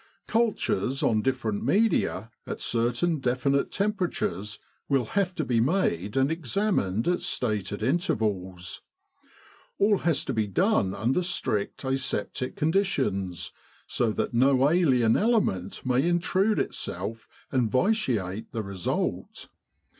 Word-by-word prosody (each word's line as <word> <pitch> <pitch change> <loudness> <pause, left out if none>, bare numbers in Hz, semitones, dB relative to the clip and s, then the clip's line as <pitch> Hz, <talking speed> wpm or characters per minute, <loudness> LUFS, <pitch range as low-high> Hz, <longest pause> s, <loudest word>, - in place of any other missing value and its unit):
Cul 230 -1 +2
tures 125 +8 -1
on 110 -2 +2
different 115 -5 -1
media, 195 - +1 0.2
at - - -4
certain 120 +8 0
definite 135 +2 +1
tempera 200 -3 0
tures, 100 +5 -3 0.3
will 135 -4 +2
have 190 -2 +1
to 160 - -2
be 120 -2 +1
made 115 - 0
and 135 +3 +3
examined 160 - 0
at 175 0 +1
stated 105 -3 -2
intervals. 105 - -1 1.0
All 205 0 +3
has 160 -2 0
to 135 - -2
be 110 -2 0
done 105 - +1
under 120 - +1
strict 170 - -2
aseptic 130 -2 -2
con 155 +2 +1
ditions, 100 - -1 0.3
so 120 -3 0
that - - -2
no 135 +3 +4
alien 130 -10 +3
element 200 - 0
may 125 +1 +2
intrude 185 +5 +2
itself 105 +6 -3 0.2
and 125 -5 +1
vitiate 120 - 0
the 115 -2 -2
result. 100 -3 -3
130 Hz, 125 wpm, -27 LUFS, 105-175 Hz, 1.0 s, no